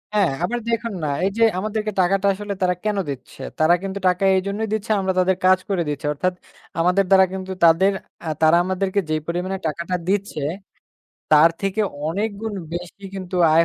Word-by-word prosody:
হ্যাঁ। 195 -8 +3
আবার 240 +7 -1
দেখুন 230 -1 -1
না - - 0 0.2
এই - - +2
যে, - - -1 0.2
আমাদেরকে 215 +1 -2
টাকাটা 195 +2 +2
আসলে 205 +1 -5
তারা 180 -1 +2
কেন 210 -1 0
দিচ্ছে? 135 0 -8 0.2
তারা 160 +2 +5
কিন্তু 195 0 -4
টাকা 180 +1 +1
এইজন্যই 200 +4 -1
দিচ্ছে, 220 +1 -2
আমরা 190 -1 0
তাদের 185 0 +2
কাজ 185 0 +5
করে 190 -3 +1
দিচ্ছি। 145 0 -4
অর্থাৎ 185 +5 -1 0.5
আমাদের 180 +3 +3
দ্বারা 190 0 +7
কিন্তু 190 0 -5
তাদের 170 +4 +5 0.4
আ - - -1
তারা 160 +2 +6
আমাদেরকে 190 +2 -1
যেই 155 0 0
পরিমাণে 180 +3 -2
টাকাটা 170 +3 -3
দিচ্ছে, 195 -5 -1 0.9
তার 155 +2 +7
থেকে 195 +2 -1 0.3
অনেক 200 +8 0
গুণ 220 -1 -4 0.2
বেশি 175 +3 -7
কিন্তু 185 -1 -5 0.2
আয় 165 +1 +6
190 Hz, 180 wpm, -22 LUFS, 175-200 Hz, 0.9 s, দ্বারা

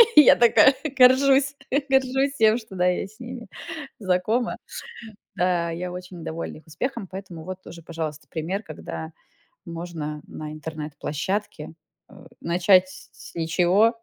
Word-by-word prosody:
Я 300 - +9
такая 240 +3 +6 0.2
горжусь 270 +2 +6 0.3
горжусь 265 +1 +2
тем, 220 -1 +5
что, 220 -4 -10
да, 180 0 +2
я 180 - +1
с 215 +4 -20
ними 245 -1 -8 0.5
знакома. 210 +5 0 0.8
Да, 175 -2 +1
я 175 +2 -4
очень 180 -2 -8
довольна 165 +1 -5
их 155 - -16
успехом, 230 - -4
поэтому 185 -3 -8
вот 185 +1 -6
тоже, 170 - -11
пожалуйста, 160 -2 -5
пример, 175 +6 -3
когда 160 -4 -7 0.5
можно 165 -3 -5
на 155 -1 -7
интернет-площадке, 155 +3 -4 0.4
э, - - -17 0.3
начать 185 +2 +4
с 190 - -12 0.2
с - - -27
ничего 180 +8 +3
180 Hz, 135 wpm, -24 LUFS, 165-230 Hz, 0.8 s, Я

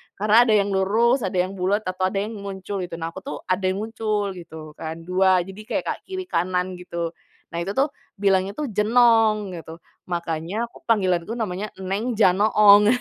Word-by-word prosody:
Karena 215 +4 +4
ada 215 - +4
yang 200 -1 +2
lurus, 225 +7 +3
ada 185 - -5
yang 185 +1 -1
bulet, 200 +4 +1
atau 185 0 -1
ada 195 +1 -1
yang 215 -1 -6
muncul 195 0 -5
gitu, 175 -2 -5
nah 165 0 -4
aku - - -8
tuh 280 - -6 0.2
ada 185 +1 0
yang 195 +3 -1
muncul 215 -3 -2
gitu 160 -4 -10
kan, 160 +1 -6
2, 185 0 +3
jadi 195 +3 -10
kayak - - -1
ka - - 0
kiri 375 -1 -4
kanan 180 - -1
gitu. 170 -2 -4 0.4
Nah 170 - -5
itu 195 +3 -3
tuh 275 +2 +2 0.2
bilangnya 195 0 +1
tuh 290 -6 -3
jenong 215 -1 +3
gitu, 160 0 -10 0.3
makanya 170 +1 -3 0.3
panggilanku 190 -1 +1
namanya 210 -2 -3 0.2
Neng 215 +6 -2
Janoong. 205 +1 +6
195 Hz, 180 wpm, -23 LUFS, 180-215 Hz, 0.4 s, Janoong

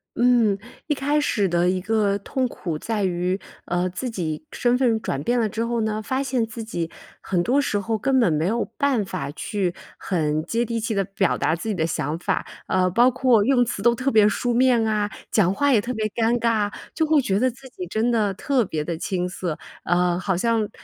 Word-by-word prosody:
嗯， 240 -4 +4 0.3
一 310 - +1
开 290 +2 +1
始 205 -10 +1
的 175 +1 +2
一 185 0 +1
个 205 0 +1
痛 255 +5 -1
苦 170 -9 -5
在 215 +5 -2
于， 180 +1 0 0.3
呃， 175 +1 0
自 185 +8 -4
己 155 -6 -4
身 245 0 +1
份 235 -4 +2
转 135 - -2
变 240 +8 +1
了 220 -2 +1
之 225 +3 -2
后 235 0 -1
呢， 215 0 -1
发 260 +5 -1
现 255 -4 0
自 225 +1 -7
己 170 -7 -4 0.3
很 180 -2 -1
多 245 +10 +2
时 210 -7 0
候 220 +2 -1
根 265 +4 +2
本 230 -9 +3
没 155 +1 +1
有 225 +5 +1
办 280 -7 +2
法 180 -7 -4
去 185 +3 -2 0.2
很 155 -4 -1
接 230 +6 0
地 230 -1 -2
气 225 0 -2
地 195 -1 +1
表 195 0 0
达 160 - +1
自 170 - -7
己 215 - 0
的 165 -4 0
想 150 -1 -2
法。 - - -1 0.2
呃， 185 0 +2
包 240 +7 +5
括 250 -4 +3
用 245 +1 +3
词 225 -4 -4
都 235 +2 +4
特 255 +3 0
别 215 -2 +6
书 245 +3 -1
面 245 -2 +4
啊， 210 -1 0 0.2
讲 190 -5 +3
话 285 +8 +2
也 220 - +4
特 235 +4 -4
别 220 -1 -1
尴 230 +2 +1
尬， 220 -3 +1 0.2
就 320 - 0
会 310 -1 +4
觉 200 -7 +1
得 255 +2 +3
自 250 +3 -12
己 180 -7 -7
真 220 +6 0
的 210 -4 +1
特 265 +4 +1
别 155 -6 -3
地 165 +2 -3
青 180 -2 -1
涩。 180 -3 -4 0.3
呃， 175 0 +2
好 190 -2 -1
像， 225 0 +1
215 Hz, 240 characters per minute, -23 LUFS, 180-240 Hz, 0.3 s, 别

